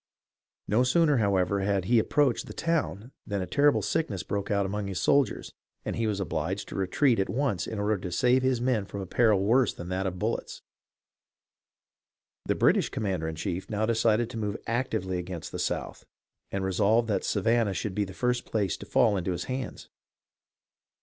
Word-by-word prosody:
No 110 +5 +3
sooner, 145 +3 +3
however, 100 -2 +2
had 100 -1 0
he 120 +3 +4
approached 135 +2 +1
the - - -9
town 140 - -1 0.2
than 100 -2 -2
a 90 - -2
terrible 145 +9 +3
sick 160 - 0
ness 95 -4 -4
broke 100 -1 -3
out 100 -1 +1
among 100 +1 -3
his 95 -3 -3
soldiers, 140 +8 +1 0.3
and - - -2
he 115 -1 0
was 105 -2 -1
obliged 95 +2 -2
to - - -7
retreat 110 +6 +2
at 95 - 0
once 115 - -1
in 110 - -5
order 105 0 0
to 90 - -5
save 125 +8 +3
his 130 -2 +1
men 120 -4 0
from 100 +1 -6
a - - -4
peril 105 0 +3
worse 120 +3 +3
than 85 - -7
that 95 +1 -1
of 90 0 -4
bullets. - - -3 1.8
The - - 0
British - - +3
commander 95 -6 -2
in 80 - -4
chief 90 +2 -4
now 110 0 0
decided 115 0 +2
to 120 - -6
move 105 -1 -2
actively 110 -6 -1
against 90 -1 -6
the - - -5
South, - - -3 0.5
and 95 -1 -2
resolved 105 +5 +2
that 105 - 0
Savannah 110 0 +1
should 105 0 -3
be 105 +2 0
the 95 -1 -8
first 125 0 0
place 100 -6 -1
to - - -10
fall 105 -2 +3
into 90 0 -1
his 85 - -3
hands. 130 0 -5
105 Hz, 190 wpm, -28 LUFS, 95-120 Hz, 1.8 s, he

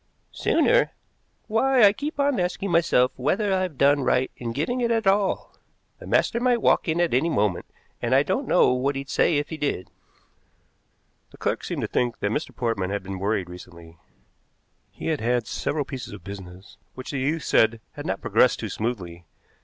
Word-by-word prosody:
"Sooner? - - +2 0.5
Why, 250 +3 +3
I 200 -1 +7
keep 290 +6 -5
on 280 -5 +2
asking 180 +2 -2
myself 165 -7 +3
whether 195 - 0
I've 185 -6 -1
done 145 +2 +4
right 130 0 +1
in 120 -2 -5
giving 160 - -2
it 235 - +1
at 225 -2 +1
all. 195 0 +1 0.5
The - - -11
master 235 - +2
might 245 -1 +2
walk - - +3
in 160 +1 0
at 175 -5 +1
any 140 +7 +2
moment, 105 - 0 0.3
and 120 +2 +1
I 135 - +5
don't 260 - -2
know 180 - +4
what 135 +2 0
he'd 135 0 -5
say 160 - +3
if 145 0 -2
he 160 - -5
did." 145 -11 -3 1.4
The - - -17
clerk - - -2
seemed - - -4
to - - -1
think 120 -2 -1
that 100 - -1
Mr. 150 - -2
Portman 115 -6 -1
had 100 -1 -3
been 95 0 -6
worried 100 -2 -1
recently. 85 -2 -12 0.9
He - - -10
had 155 -3 -1
had 120 0 +1
several 145 +5 -2
pieces 130 -2 -7
of - - -10
business 95 -1 -10 0.2
which 130 - -7
the 140 - -2
youth 150 +4 -1
said 110 0 +3
had - - -8
not - - -2
progressed - - +3
too - - -4
smoothly. 90 -7 -4
135 Hz, 190 wpm, -24 LUFS, -, 1.4 s, I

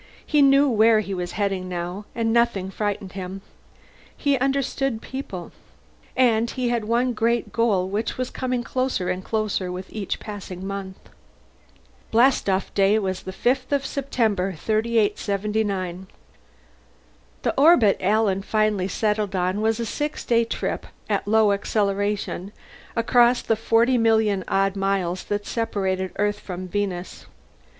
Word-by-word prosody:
He 300 -1 +3
knew 275 +1 +6
where 220 -2 +4
he 200 -1 -5
was 180 -1 -4
heading, 195 -3 -1
now, 180 +3 -4
and 225 -1 0
nothing 235 -5 +1
frightened 200 -1 -3
him. 190 +1 -6 0.8
He 285 -2 +2
understood 270 -2 0
people. 220 -10 -7 0.7
And 235 -2 +3
he 250 -1 -2
had 235 -3 -1
one 240 +3 +1
great 235 +1 0
goal 210 -6 +1
which 205 +4 -2
was 255 0 -3
coming 255 -2 -2
closer 255 -8 -1
and 185 +1 -2
closer 210 -4 -1
with 185 +1 -7
each 210 -3 -3
passing 195 -3 -7
month. 195 -1 -5 1.1
Blastoff 225 -5 +2
day 200 +2 +4
was 190 -3 -2
the 190 - -6
fifth 255 +6 0
of 280 -1 +1
September, 220 -9 0
3879. 205 -2 -1 1.4
The - - +1
orbit 275 - +5
Alan 200 0 +2
finally 215 -2 +1
settled 210 -1 -1
on 185 +3 0
was 220 +1 +1
a 235 - -1
six 295 +7 -3
day 235 -1 +3
trip - - -3 0.2
at 200 0 0
low 220 -1 +4
acceleration 200 -1 -1 0.4
across 240 +1 +4
the - - +2
40,000,000 225 -3 +2
odd 195 0 +1
miles 195 -2 -1
that 205 0 -2
separated 190 -5 -1
Earth 205 0 0
from 185 0 -6
Venus. 185 -2 -4
210 Hz, 135 wpm, -23 LUFS, 190-235 Hz, 1.4 s, knew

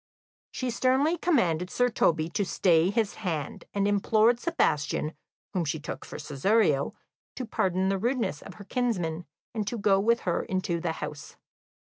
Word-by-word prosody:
She 255 -1 -3
sternly 265 +7 +2
commanded 180 - +1
Sir 245 +5 +2
Toby 160 -8 +2
to 205 - 0
stay 175 -2 +3
his 210 0 0
hand, 160 -7 -3
and 200 0 +1
implored 215 +3 +3
Sebastian, 155 - 0 0.4
whom 180 -3 +1
she 155 0 -2
took 150 - -6
for - - -8
Cesario, 150 +1 +1 0.4
to 255 - -4
pardon 190 -3 0
the 195 0 0
rudeness 235 - -1
of 195 - -11
her 205 - -10
kinsman, 180 -8 -2 0.3
and 215 -3 -2
to 240 - -2
go 195 -2 +3
with 230 +4 +2
her 175 -2 0
into 185 -2 -2
the 165 -1 -2
house. 150 -2 -7
195 Hz, 160 wpm, -28 LUFS, 165-235 Hz, 0.4 s, stay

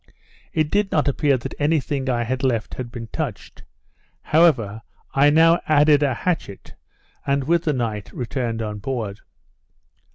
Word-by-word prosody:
It 155 -1 0
did 205 -1 +1
not 150 -1 +1
appear 140 -1 +2
that 120 - -7
any 150 +2 +2
thing 135 -1 -3
I 120 -2 +1
had 130 +2 -3
left 120 -5 -1
had 125 -2 -6
been 115 -1 -7
touched; 140 -11 -5 0.6
however, 130 -10 +3 0.3
I 140 +2 +5
now 165 +3 +5
added 150 -1 +5
a 140 -4 +1
hatchet, 155 - -4 0.5
and, 140 0 +1
with 170 +4 +1
the 155 - +2
night, 110 -5 -3
returned 120 -2 -3
on 105 -1 -5
board. 110 -4 -4
135 Hz, 155 wpm, -22 LUFS, 115-155 Hz, 0.6 s, I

